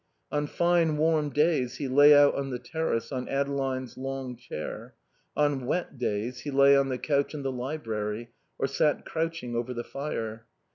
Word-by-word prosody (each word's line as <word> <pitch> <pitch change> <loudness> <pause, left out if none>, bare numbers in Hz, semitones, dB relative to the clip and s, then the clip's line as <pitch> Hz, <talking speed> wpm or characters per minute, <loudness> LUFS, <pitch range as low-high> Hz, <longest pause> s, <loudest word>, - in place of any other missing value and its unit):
On 145 0 0
fine 170 -1 +2
warm 155 -1 +2
days 145 -4 +1
he 140 - -3
lay 145 +3 +7
out 145 0 +6
on 140 -1 -3
the 125 - -3
terrace 125 0 -2
on 130 -2 -4
Adeline's 135 -2 -2
long 135 -1 -4
chair; 120 -10 -7 0.4
on 145 -4 +1
wet 150 -4 -2
days 120 +2 -2
he 145 - -6
lay 140 0 +6
on 140 -1 +3
the 130 - -1
couch 140 +2 0
in 145 - -5
the 135 - -1
library, 120 -4 -4 0.3
or - - 0
sat 140 +2 +1
crouching 160 -7 -3
over 120 +2 -2
the 120 - -3
fire. 115 -6 -5
135 Hz, 175 wpm, -28 LUFS, 125-150 Hz, 0.4 s, lay